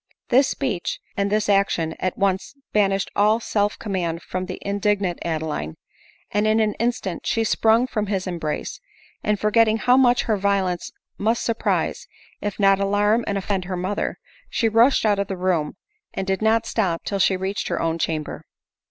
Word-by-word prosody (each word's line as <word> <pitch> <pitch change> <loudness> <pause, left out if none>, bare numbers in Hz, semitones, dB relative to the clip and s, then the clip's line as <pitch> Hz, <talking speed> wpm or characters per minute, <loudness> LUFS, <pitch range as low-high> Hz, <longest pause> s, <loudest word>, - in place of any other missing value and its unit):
This 260 +2 +5
speech, 200 - -2 0.2
and 200 0 0
this 215 0 +1
action, 195 -5 +2
at 185 - -2
once 195 +5 0 0.2
banished 195 -2 +1
all 215 +2 +4
self 205 -2 0
command 175 -5 -3
from 185 0 -4
the 185 - -5
indignant 200 -2 0
Adeline, 155 - -3 0.6
and 210 +1 +1
in 215 +1 +3
an 215 -1 +2
instant 235 -6 -2
she 225 - +1
sprung 225 +2 +3
from 215 -5 -2
his 195 -2 -1
embrace; 170 -5 -4 0.4
and 210 -1 +1
for 210 +1 +1
getting 225 0 +4
how 245 +3 +4
much 250 -2 +4
her 215 -2 0
violence 190 -3 0 0.3
must 225 +3 +1
surprise, 230 -1 -1 0.3
if 205 0 -4
not 195 -1 +4
alarm 205 +3 +2
and 200 - 0
offend 195 -1 -2
her 185 0 -3
mother, 185 +3 -2 0.3
she 230 - +1
rushed 225 +3 +4
out 205 -2 +3
of 200 - -1
the 195 - -4
room, 175 -5 0 0.4
and 190 - -2
did 190 +1 -1
not 225 +1 +3
stop 185 -8 -1
till 200 - -2
she 190 0 +3
reached 190 +2 -3
her - - -1
own 165 0 -1
chamber. 155 -2 -3
200 Hz, 180 wpm, -23 LUFS, 185-215 Hz, 0.6 s, This